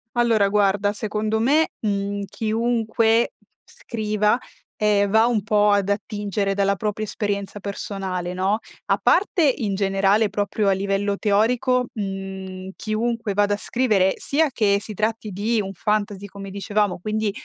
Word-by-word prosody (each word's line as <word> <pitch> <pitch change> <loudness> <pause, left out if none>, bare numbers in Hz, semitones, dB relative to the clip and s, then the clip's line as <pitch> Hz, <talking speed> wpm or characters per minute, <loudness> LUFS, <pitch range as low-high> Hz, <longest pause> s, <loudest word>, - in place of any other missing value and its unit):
Allora 230 -4 +3
guarda, 205 0 +2
secondo 215 +1 -2
me, 290 +8 +3
mhmm, 200 -1 -2
chiunque 225 +1 +1 0.3
scriva, 215 - -1 0.4
ehm, 205 -2 +2
va 220 +2 +5
un 225 -4 0
po' 210 -1 +3
ad 200 -1 +2
attingere 200 -1 -1
dalla 200 0 +2
propria 210 +2 -2
esperienza 205 -1 -3
personale, 190 -3 -4
no. 190 +3 +1 0.3
A - - +2
parte 375 -2 +3
in 205 -4 -1
generale, 195 +2 +2
proprio 205 +1 0
a - - +4
livello 200 +1 0
teorico, 245 +5 +2
mhmm, 190 -2 -5
chiunque 225 0 -2
vada 205 0 +3
a - - -8
scrivere, 210 -5 +2
sia 310 +2 +1
che 205 -5 +2
si 215 +1 -7
tratti 215 +1 -1
di 215 +4 0
un 195 -1 -5
fantasy, 205 0 -1
come 195 0 -9
dicevamo, 200 0 -1
quindi, 215 +2 -1
205 Hz, 140 wpm, -23 LUFS, 200-220 Hz, 0.4 s, va